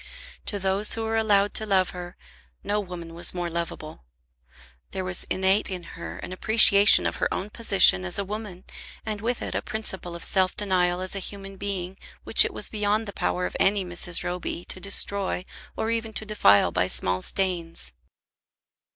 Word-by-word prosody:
To 205 - -2
those 195 +2 0
who 225 - -4
were 225 0 -2
allowed 205 -2 +2
to 220 - +1
love 190 -2 +1
her 175 -1 -9 0.5
no 205 +1 -1
woman 175 -4 -8
was 170 +2 +3
more 175 -1 -3
lovable. 165 - -6 0.9
There 190 -1 -4
was 180 0 -2
innate 190 +2 +1
in 185 -2 -5
her 80 0 -8
an 180 - -8
appreciation 205 0 +7
of - - -2
her - - -1
own 205 +2 -4
position 195 - +5
as 90 - -2
a 200 - -2
woman, 205 -3 -7 0.4
and 215 -2 -4
with 235 +2 -3
it - - -5
a - - -2
principle 190 -5 -3
of 170 - -9
self 185 -1 0
denial 180 -3 0
as 185 +1 -3
a - - -3
human 195 0 -8
being, 195 -1 -5 0.2
which - - +5
it - - -3
was - - 0
beyond 210 +1 -1
the 200 - -7
power 90 - -2
of 90 - -6
any 195 -1 +2
Mrs. 175 -1 -2
Roby 175 -1 -5
to - - -1
destroy 200 -1 0 0.3
or 220 - -2
even 225 -1 -3
to 220 - -5
defile 100 - +3
by 90 +2 0
small 90 0 -2
stains. 175 - -2
190 Hz, 185 wpm, -24 LUFS, 175-205 Hz, 0.9 s, appreciation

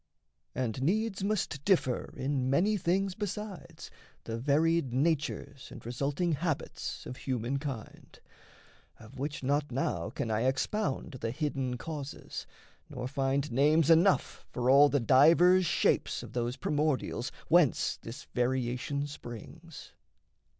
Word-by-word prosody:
And 125 -1 -2
needs 200 +5 0
must 195 -9 -1
differ 155 -10 +1
in 130 -1 -1
many 190 +10 +3
things 190 +1 0
besides 200 -4 -6 0.3
The 115 - -4
varied 150 +2 +2
natures 140 -1 -1
and - - -11
resulting 140 +8 -1
habits 160 0 -3
Of 125 - -7
humankind 130 0 -4 0.8
of 115 +4 -13
which 145 0 -4
not 145 +2 0
now 90 -9 -1
can 115 - -3
I 110 +1 +1
Expound 135 +1 -1
the 115 - -1
hidden 130 -2 -2
causes, 145 +1 -6 0.4
nor 125 0 -5
find 135 +2 -1
names 150 +5 +4
Enough 175 +4 +3
for 125 +1 +1
all 145 +2 +7
the 145 - +2
divers 165 - +5
shapes - - +1
of - - -10
those 120 +1 -2
Primordials 145 -3 -1 0.2
whence 165 -4 +3
this 115 +2 -8
variation 125 +3 -1
springs. 145 +3 -10
140 Hz, 120 wpm, -30 LUFS, 130-165 Hz, 0.8 s, all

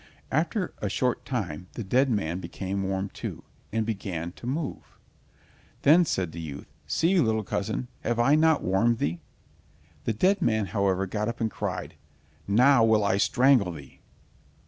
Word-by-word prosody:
After 170 - 0
a 105 - -2
short 125 +4 -1
time 90 - -4
the 115 - -5
dead 130 +7 +2
man 90 -6 -1
became 95 +1 -4
warm 95 0 -2
too, - - -7 0.3
and 110 0 0
began 95 -6 -4
to 120 - -10
move. 145 +3 -4 0.9
Then 165 +5 +6
said 95 - -1
the 85 - -7
youth: 75 -3 -7 0.2
"See, 180 +3 +2
little 110 -6 +2
cousin, 60 -9 -3
have 120 0 -1
I 120 +5 +4
not 160 0 +4
warmed 110 +6 +2
thee?" 85 -1 -2 0.9
The - - +1
dead 190 - +2
man, 110 - +2
however, 95 -1 0
got 105 +3 -2
up 115 0 -4
and 110 -2 0
cried, - - -4 0.5
"Now 120 +5 +5
will 110 -2 +4
I 100 -1 +2
strangle 120 -2 +4
thee." 70 -4 -12
110 Hz, 160 wpm, -27 LUFS, 95-130 Hz, 0.9 s, Then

